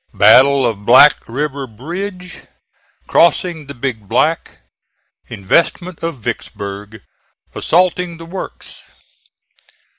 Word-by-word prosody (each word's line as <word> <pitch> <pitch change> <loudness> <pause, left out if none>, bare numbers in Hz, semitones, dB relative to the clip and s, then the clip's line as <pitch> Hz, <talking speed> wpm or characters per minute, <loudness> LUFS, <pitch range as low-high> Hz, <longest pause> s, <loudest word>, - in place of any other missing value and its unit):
BATTLE 130 +7 +5
OF 110 -4 -3
BLACK 130 +6 +6
RIVER 140 +2 -4
BRIDGE 180 - -8 0.6
CROSSING 170 -3 +1
THE 140 - -8
BIG 115 -5 -5
BLACK - - 0 0.7
INVESTMENT 170 - -1
OF 165 -3 -4
VICKSBURG 100 0 -7 0.5
ASSAULTING 180 0 0
THE 165 - -11
WORKS. 180 +3 -9
140 Hz, 90 wpm, -16 LUFS, 110-170 Hz, 0.7 s, BLACK